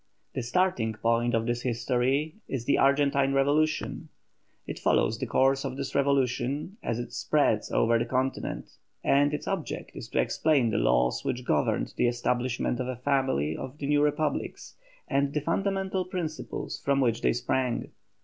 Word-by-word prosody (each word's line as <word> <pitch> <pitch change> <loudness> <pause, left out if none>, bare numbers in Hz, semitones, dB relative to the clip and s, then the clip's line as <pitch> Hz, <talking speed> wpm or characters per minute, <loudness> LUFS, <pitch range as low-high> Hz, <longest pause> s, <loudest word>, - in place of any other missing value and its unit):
The 130 - -2
starting 125 -3 +1
point 115 +2 +1
of 115 0 0
this 120 0 -1
history 125 +5 0
is 125 -4 -4
the 140 - +2
Argentine 140 0 +3
revolution; 150 +3 +1 0.6
it - - -6
follows - - +2
the - - -3
course 135 +1 +2
of 135 -1 -4
this 140 -1 -4
revolution 140 - 0
as 115 - -2
it 120 - -6
spreads - - +1
over 115 0 +3
the - - 0
continent, 130 +1 -2 0.3
and 145 +1 +3
its 150 - -4
object 190 -6 -3
is - - -8
to - - -1
explain 140 -8 +2
the - - +1
laws 60 +1 +2
which 125 0 -3
governed 75 -8 0
the - - +3
establishment 120 +1 -1
of 125 - -2
a 130 - -3
family 125 - 0
of 130 +3 -7
new 145 +1 +2
Republics, 150 +1 -1 0.3
and 140 0 +1
the 150 - +1
fundamental 190 +3 -1
principles 175 -4 -5
from 140 0 +2
which 115 -4 +1
they - - +3
sprang. 125 0 -1
135 Hz, 160 wpm, -28 LUFS, 120-145 Hz, 0.6 s, Argentine